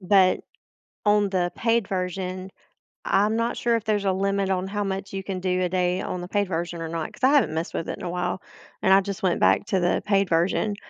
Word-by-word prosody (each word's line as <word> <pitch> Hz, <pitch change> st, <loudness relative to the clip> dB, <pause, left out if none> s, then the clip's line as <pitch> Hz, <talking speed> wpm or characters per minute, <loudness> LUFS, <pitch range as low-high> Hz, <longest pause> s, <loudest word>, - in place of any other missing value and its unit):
but 190 Hz, -1 st, +4 dB, 0.7 s
on 205 Hz, -1 st, +4 dB
the 180 Hz, -2 st, 0 dB
paid 230 Hz, -3 st, +1 dB
version, 185 Hz, 0 st, -3 dB, 0.6 s
I'm 210 Hz, +3 st, +2 dB
not 230 Hz, +1 st, 0 dB
sure 235 Hz, -1 st, +1 dB
if 225 Hz, -, -6 dB
there's 210 Hz, -2 st, +1 dB
a 195 Hz, -, +3 dB
limit 195 Hz, +1 st, 0 dB
on 185 Hz, 0 st, 0 dB
how 205 Hz, +1 st, -2 dB
much 195 Hz, 0 st, -4 dB
you 195 Hz, 0 st, -3 dB
can 190 Hz, -1 st, -4 dB
do 185 Hz, 0 st, 0 dB
a 180 Hz, -, +1 dB
day 180 Hz, 0 st, 0 dB
on 180 Hz, -, -4 dB
the 175 Hz, -, -6 dB
paid 205 Hz, +1 st, 0 dB
version 170 Hz, 0 st, -3 dB
or 165 Hz, -, -4 dB
not, 165 Hz, -1 st, -4 dB
'cause -, -, -17 dB
I 260 Hz, -, +6 dB
haven't 280 Hz, -, +3 dB
messed 160 Hz, +1 st, -3 dB
with 165 Hz, -, -3 dB
it -, -, -4 dB
in -, -, -10 dB
a 175 Hz, -, -3 dB
while, 180 Hz, +1 st, -2 dB, 0.4 s
and 190 Hz, -, +4 dB
I 195 Hz, -, +8 dB
just 195 Hz, -1 st, -6 dB
went 180 Hz, -2 st, +2 dB
back -, -, +3 dB
to 195 Hz, -5 st, +1 dB
the 175 Hz, 0 st, +1 dB
paid 200 Hz, -2 st, +2 dB
version, 180 Hz, +5 st, +1 dB
190 Hz, 240 wpm, -25 LUFS, 180-200 Hz, 0.7 s, I